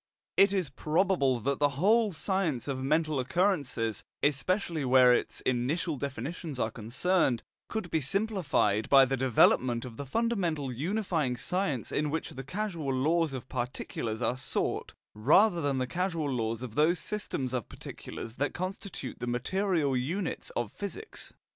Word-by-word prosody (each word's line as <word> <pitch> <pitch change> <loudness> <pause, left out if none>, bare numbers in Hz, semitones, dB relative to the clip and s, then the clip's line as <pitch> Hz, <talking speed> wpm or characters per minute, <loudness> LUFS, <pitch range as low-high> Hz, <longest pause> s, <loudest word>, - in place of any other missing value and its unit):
It 195 0 +6
is 185 -8 -1
probable 150 -3 +1
that 140 +4 -1
the 145 -2 +2
whole 215 +5 +4
science 170 - -1
of 135 -2 -2
mental 155 +1 +1
occurrences, 130 - 0 0.2
especially 160 +3 +1
where 130 -1 +6
its - - -1
initial 140 +7 0
definitions 140 +2 -5
are 110 - 0
concerned, 120 - +1 0.3
could 220 -6 -4
be 160 - +1
simplified 145 - +1
by 135 -1 +8
the 135 +1 0
development 125 -1 +3
of 115 -3 -9
the 140 - -5
fundamental 175 - 0
unifying 160 - -1
science 150 - -1
in 150 0 0
which 160 +2 -3
the 135 - -7
causal 170 -2 -3
laws 155 +5 +2
of 130 -2 -6
particulars 120 -2 -3
are 120 +3 0
sought, 130 0 -2 0.2
rather 170 - +4
than 140 -2 0
the 130 - 0
causal 170 +1 -1
laws 115 -3 -2
of 120 -4 -6
those 155 +6 +3
systems 150 - -3
of 125 -4 -3
particulars 115 +1 -8
that 140 +1 -1
constitute 185 +1 -5
the 120 - -4
material 150 +4 0
units 165 +9 -2
of 120 -3 -2
physics. 410 - -5
145 Hz, 150 wpm, -30 LUFS, 125-180 Hz, 0.3 s, by